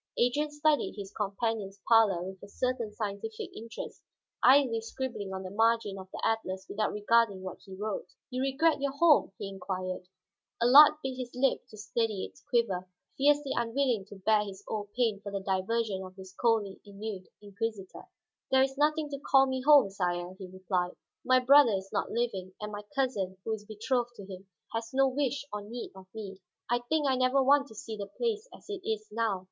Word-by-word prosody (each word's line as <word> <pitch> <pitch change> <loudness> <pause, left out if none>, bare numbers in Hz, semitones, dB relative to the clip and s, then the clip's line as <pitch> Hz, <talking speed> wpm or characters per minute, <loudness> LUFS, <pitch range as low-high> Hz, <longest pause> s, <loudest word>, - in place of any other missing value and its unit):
Adrian 270 +5 +2
studied 295 0 +1
his 200 -1 -7
companion's 205 -1 -2
pallor 215 -6 +5
with 190 0 -8
a 200 - -10
certain 245 +1 -2
scientific 210 +1 -5
interest, 225 +1 -8 0.4
idly 255 -4 +5
scribbling 225 -4 -5
on 190 0 -5
the 185 - -7
margin 225 -1 +2
of 190 0 -10
the - - -7
atlas 190 -4 -1
without 215 +1 -1
regarding 210 -2 +2
what 185 - -7
he 190 - -10
wrote. 205 -1 -4 0.2
"You 255 +1 -2
regret 275 +3 +2
your 280 -1 0
home?" 300 -6 +4
he - - -5
inquired. 185 -1 -5 0.5
Allard 270 +6 +9
bit 260 -1 -3
his 250 -2 -4
lip 265 +2 +1
to 215 - -12
steady 215 -1 -1
its - - -14
quiver, 190 -7 0 0.3
fiercely 285 0 +3
unwilling 235 -3 0
to 205 - -12
bare 210 +2 +2
his 200 -1 -9
old 205 -2 -4
pain 225 -5 +1
for 200 0 -6
the 195 - -2
diversion 195 +2 -1
of 185 0 -10
this 190 -1 -11
coldly 215 -3 0
ennuied 200 -2 -7
inquisitor. 205 -1 -6 0.4
"There 265 0 +5
is 270 +1 -2
nothing 305 +1 +2
to 280 -1 -5
call 270 -1 +5
me 260 -1 -2
home, 280 -7 +6
sire," 180 -2 -2
he 190 - -7
replied. 185 -1 -2 0.3
"My 255 0 +5
brother 265 -2 +6
is 195 0 -3
not - - 0
living, 195 -6 -2
and 210 0 -5
my 205 0 -5
cousin, 210 -9 -1
who 225 - -2
was 215 -1 -4
betrothed 240 +3 -2
to 200 - -9
him, 190 0 -10 0.3
has 225 +3 -4
no 270 0 +5
wish 275 +1 -1
or 210 - -3
need 230 +4 -7
of 190 -1 -13
me. 195 -3 -7 0.3
I 240 - +3
think 310 -2 +2
I 265 - +3
never 255 +1 +3
want 280 +1 +4
to 220 - -14
see 220 +1 -6
the 200 -1 -5
place 445 - -2
as - - -15
it 405 -2 -5
is 215 -1 -2
now. 220 -3 0
220 Hz, 195 wpm, -30 LUFS, 195-260 Hz, 0.5 s, Allard